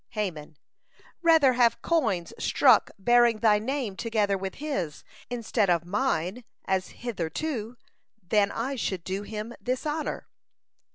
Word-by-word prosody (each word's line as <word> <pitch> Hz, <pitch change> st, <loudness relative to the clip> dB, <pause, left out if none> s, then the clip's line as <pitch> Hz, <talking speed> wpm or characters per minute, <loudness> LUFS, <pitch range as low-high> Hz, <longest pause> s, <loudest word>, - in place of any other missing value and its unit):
Haman: 160 Hz, -7 st, -4 dB, 0.6 s
"Rather 320 Hz, -6 st, +5 dB
have 240 Hz, -1 st, +2 dB
coins 220 Hz, -, 0 dB
struck 250 Hz, -6 st, +4 dB
bearing 240 Hz, +2 st, +4 dB
thy 215 Hz, -2 st, +4 dB
name 245 Hz, -3 st, -3 dB
together 215 Hz, -3 st, 0 dB
with 190 Hz, 0 st, -5 dB
his, 195 Hz, -, -4 dB, 0.3 s
instead 230 Hz, -4 st, 0 dB
of 170 Hz, -1 st, +2 dB
mine 200 Hz, 0 st, -1 dB, 0.2 s
as 190 Hz, -1 st, 0 dB, 0.2 s
hitherto, 230 Hz, -, -3 dB, 0.4 s
than 200 Hz, +1 st, +1 dB
I 260 Hz, +4 st, -3 dB
should 190 Hz, -6 st, -2 dB
do 190 Hz, +2 st, -3 dB
him 215 Hz, +2 st, -6 dB
this 255 Hz, +3 st, -2 dB
honor." 305 Hz, +1 st, -3 dB
220 Hz, 125 wpm, -27 LUFS, 190-250 Hz, 0.6 s, Rather